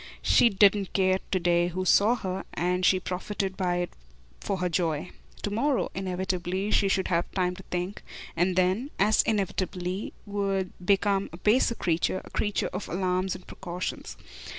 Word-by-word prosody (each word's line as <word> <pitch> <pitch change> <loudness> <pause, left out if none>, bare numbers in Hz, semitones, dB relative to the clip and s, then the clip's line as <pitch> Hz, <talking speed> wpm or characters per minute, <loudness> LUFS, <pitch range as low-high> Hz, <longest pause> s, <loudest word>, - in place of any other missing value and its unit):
She 235 - +5
didn't 200 -1 +3
care 185 -1 +3
to 185 - +1
day 175 0 +2
who 185 +2 -3
saw 210 +6 +5
her, 190 -4 -4
and 180 +2 0
she 185 0 +4
profited 190 +1 -3
by 180 -2 0
it 175 0 -2 0.5
for 200 - -2
her 180 0 0
joy. 165 -2 -1 0.3
To 205 - -2
morrow, 265 +6 +1
inevitably, 185 +1 -2
she 200 - +3
should 195 -1 +1
have 170 -1 +1
time 180 -1 0
to 190 - -10
think 180 +3 -3 0.3
and 175 +2 +1
then, 185 +9 +1
as 210 +3 +4
inevitably, 190 -2 -2
would 195 -2 -1
become 195 +1 +2
a 165 - -9
baser 230 +5 +3
creature, 175 0 0
a - - -13
creature 205 -1 -1
of - - -5
alarms 185 +1 0
and 185 - -11
precautions. 180 0 -6
185 Hz, 165 wpm, -27 LUFS, 180-200 Hz, 0.5 s, She